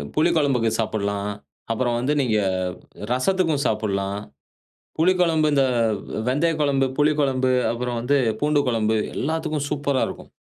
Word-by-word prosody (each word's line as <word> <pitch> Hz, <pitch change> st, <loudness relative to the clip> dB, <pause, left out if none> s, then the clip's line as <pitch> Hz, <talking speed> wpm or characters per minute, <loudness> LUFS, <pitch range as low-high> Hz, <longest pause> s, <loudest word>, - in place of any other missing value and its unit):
புளி 160 Hz, +3 st, +3 dB
கொழம்புக்கு 130 Hz, -7 st, +2 dB
சாப்ட்லாம். 100 Hz, -2 st, -1 dB, 0.4 s
அப்புறம் 120 Hz, +1 st, 0 dB
வந்து 130 Hz, +5 st, 0 dB
நீங்க 115 Hz, -5 st, +1 dB, 0.7 s
ரசத்துக்கு 165 Hz, +4 st, +1 dB
சாப்ட்லாம். 100 Hz, -2 st, -1 dB, 0.8 s
புளிக்கொழம்பு 165 Hz, -3 st, +3 dB
இந்த 140 Hz, -2 st, +3 dB, 0.2 s
ஆ 110 Hz, -1 st, -2 dB
வெந்தயக் 155 Hz, +4 st, +1 dB
கொழம்பு, 135 Hz, -2 st, +2 dB
புளிக்கொழம்பு, 140 Hz, -4 st, +2 dB, 0.2 s
அப்புறம் 120 Hz, 0 st, -3 dB
வந்து 140 Hz, +4 st, +2 dB, 0.2 s
பூண்டு 150 Hz, 0 st, +3 dB
கொழம்பு 110 Hz, -2 st, +1 dB, 0.2 s
எல்லாத்துக்கும் 150 Hz, 0 st, -2 dB
சூப்பர்ரா 140 Hz, -2 st, 0 dB
இருக்கும். -, -, -10 dB
135 Hz, 120 wpm, -23 LUFS, 115-150 Hz, 0.8 s, புளி